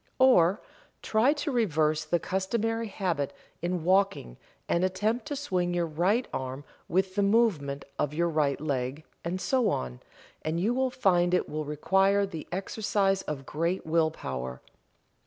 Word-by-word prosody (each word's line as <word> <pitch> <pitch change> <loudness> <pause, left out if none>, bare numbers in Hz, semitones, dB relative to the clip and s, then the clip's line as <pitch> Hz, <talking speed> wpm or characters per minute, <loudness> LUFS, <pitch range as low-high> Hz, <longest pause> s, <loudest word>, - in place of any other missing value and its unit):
Or, 205 -8 +5 0.4
try 225 +5 +3
to 290 0 -3
reverse 155 - +1
the 175 - +2
customary 225 +6 -1
habit 175 -9 -2 0.3
in 175 -1 -1
walking 190 - +1 0.3
and 170 - +1
attempt 215 +8 0
to 290 - -3
swing 180 -11 -1
your 175 -1 +1
right 180 +10 +1
arm 130 +2 -4 0.2
with 185 +1 +1
the 205 - +1
movement 200 -10 +2
of 145 - +1
your 170 +3 +1
right 150 -4 +1
leg, 140 0 -2 0.2
and 175 +2 -2
so 255 +2 +2
on, 65 -1 -3 0.4
and 160 +2 -1
you 215 +7 +1
will 260 +1 +1
find 180 -7 +2
it - - 0
will 155 0 -4
require 195 +7 +2
the 165 -6 -7
exercise 195 +1 0
of 140 -6 -5
great 170 +6 -1
will 160 0 +3
power. 65 - -5
180 Hz, 155 wpm, -28 LUFS, 155-205 Hz, 0.4 s, Or